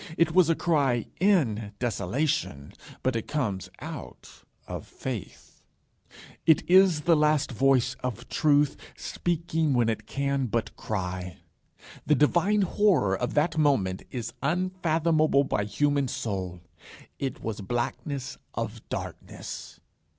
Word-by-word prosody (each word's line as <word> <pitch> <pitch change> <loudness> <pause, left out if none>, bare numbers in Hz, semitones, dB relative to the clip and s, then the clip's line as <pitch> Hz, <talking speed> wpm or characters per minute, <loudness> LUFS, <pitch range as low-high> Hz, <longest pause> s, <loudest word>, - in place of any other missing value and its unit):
It 170 -1 +3
was 180 -1 +5
a 165 - +4
cry 140 -10 +1
in 120 - +2
desolation, 120 - -1 0.3
but 130 -1 +1
it 115 - -3
came 125 -11 -1 0.2
out - - -9 0.2
of - - -6
Faith. - - -7 0.9
It 160 - +5
is 185 -3 +6
the 165 +1 +4
last 150 -2 +2
voice 130 0 +2
of 125 -1 -4
Truth, 145 -2 +3 0.2
speaking 165 -4 -1
when 120 -2 +3
it 110 -1 -3
can 140 -1 -1
but 115 0 -2
cry. 90 -4 -4 0.7
The 150 - +5
divine 180 +8 +3
horror 185 - +3
of 125 +4 -3
that 155 +2 +2
moment 115 -12 +2
is 115 -3 -5
unfathomable 165 -2 +2
by 105 -6 -1
human 140 +6 +1
soul. 95 -7 -4 0.6
It 135 -2 -4
was 110 -2 -3
blackness 130 +5 -3 0.2
of - - -4
darkness. - - -7
140 Hz, 120 wpm, -27 LUFS, 115-160 Hz, 0.9 s, is